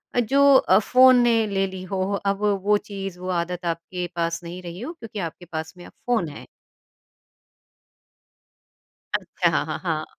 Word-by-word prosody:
अ, - - +3
जो 275 +4 +5
अ, - - +5
फ़ोन 255 +3 +6
ने 230 -2 +3
ले 195 -1 0
ली 190 -1 -8
हो, 185 0 -3 0.2
अब 200 0 0 0.2
वो 210 0 +4
चीज़ 195 -3 -7
वो 185 0 -5
आदत 175 0 -2
आपके 170 +2 -3
पास 170 0 -2
नहीं 175 +2 -7
रही 175 +1 -8
हो, 320 +7 -5
क्योंकि 225 -9 -8
आपके 175 +1 -6
पास 160 0 -6
में 175 - -11
अब - - -13
फ़ोन 235 -9 +1
है? 145 - -10 2.7
अच्छा, - - 0
हाँ, - - 0
हाँ, - - -4
हाँ। - - -1
185 Hz, 170 wpm, -23 LUFS, 175-225 Hz, 2.7 s, फ़ोन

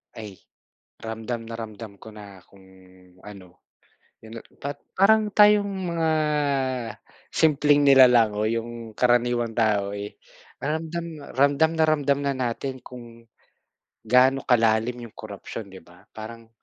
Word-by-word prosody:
Ay 105 -4 -10 0.6
ramdam 115 +1 -5
na 115 0 -8
ramdam 110 -2 -9
ko - - -14
na 100 -2 -12
kung 100 -1 -20 0.6
ano, 95 -4 -13 0.6
yun 110 +1 -11 0.2
pat 145 0 -6 0.2
parang 215 +2 +4
tayong 210 0 +5 0.2
mga 165 -1 +1 1.2
simpleng 145 -2 +3
nilalang 125 -5 +6
o 105 - -2
yung 115 0 -5
karaniwang 120 -1 +1
tao, 105 -3 0
eh, 100 0 -7 0.4
ramdam, 160 +3 -3 0.3
ramdam 140 +3 +3
na 160 - +4
ramdam 145 -3 +1
na 140 - +1
natin 130 +1 -4
kung 120 -2 -12 0.8
gaano 130 +4 +3
kalalim 115 0 +2
yung 115 - -12
korapsiyon 105 0 -9
'di 95 -1 -12
ba, 90 +1 -20
parang 115 +1 -10
120 Hz, 125 wpm, -24 LUFS, 110-140 Hz, 1.2 s, nilalang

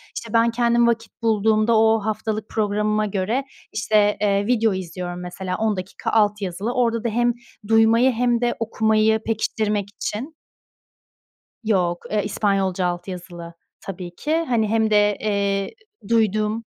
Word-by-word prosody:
İşte, 230 -1 -7
ben 230 0 +4
kendim 235 0 +2
vakit 225 -1 -2
bulduğumda 220 0 +2
o 220 0 +4
haftalık 215 0 -3
programıma 210 0 0
göre, 205 +6 -1 0.3
işte, 210 -1 +2
eee, 200 -1 +2
video 225 -4 +2
izliyorum, 180 -1 -5
mesela, 185 +1 -5
10 220 -1 0
dakika 185 +2 -5
alt 210 -1 +2
yazılı. 195 +6 -3
Orada 230 -2 0
da 235 - 0
hem 240 +2 +1 0.3
duymayı 225 +3 +4
hem 240 0 +1
de 240 0 +1
okumayı 220 -1 +2
pekiştirmek 215 -2 -1
için. 225 +8 -5 1.3
Yok. 180 -5 0
E, 210 -1 0
İspanyolca 195 -3 0
alt 175 +1 -4
yazılı, 175 -2 -8 0.3
tabii 180 -2 -8
ki. 310 - -1
Hani, 225 -3 +1
hem 220 0 +1
de, 205 -1 +3
eee, 200 -2 -1 0.4
duyduğum 215 0 +1
215 Hz, 140 wpm, -22 LUFS, 200-225 Hz, 1.3 s, ben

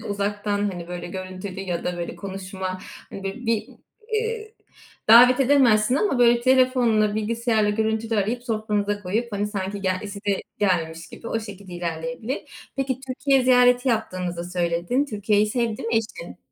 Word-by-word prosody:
de - - -11
uzaktan, 205 0 -2
hani, 175 -2 -7
böyle, 180 0 -5
görüntülü 185 +1 -6
ya 180 -3 -3
da, 180 0 -2
böyle, 170 - -5
konuşma, 190 -1 -5 0.3
hani, 195 - -8
böyle, 225 +5 -5
bir 225 -2 0 0.4
iii, 440 0 -2 0.5
davet 245 +3 +8
edemezsin 250 -4 +4
ama, 285 -4 +1
böyle, 240 -1 +5
telefonla 250 -4 +3
bilgisayarla 220 0 +1
görüntülü 220 +1 0
arayıp 220 +5 0
sofranıza 210 -3 -1
koyup, 220 +5 -2
hani, 205 0 -1
sanki 200 -1 -4
ge 190 - +1
size 200 -1 -3 0.2
gelmiş 165 -4 0
gibi - - -11
o 225 - -1
şekilde 200 -3 -10
ilerleyebilir. 220 - -5
Peki, 265 -2 -1
Türkiye 270 +1 +2
ziyareti 250 0 +5
yaptığınızı 180 -6 -2
söyledin. 175 +8 0
Türkiye'yi 210 -4 +1
sevdi 230 0 -1
mi 230 - -3
eşin? 210 -6 -4
210 Hz, 150 wpm, -24 LUFS, 190-240 Hz, 0.5 s, davet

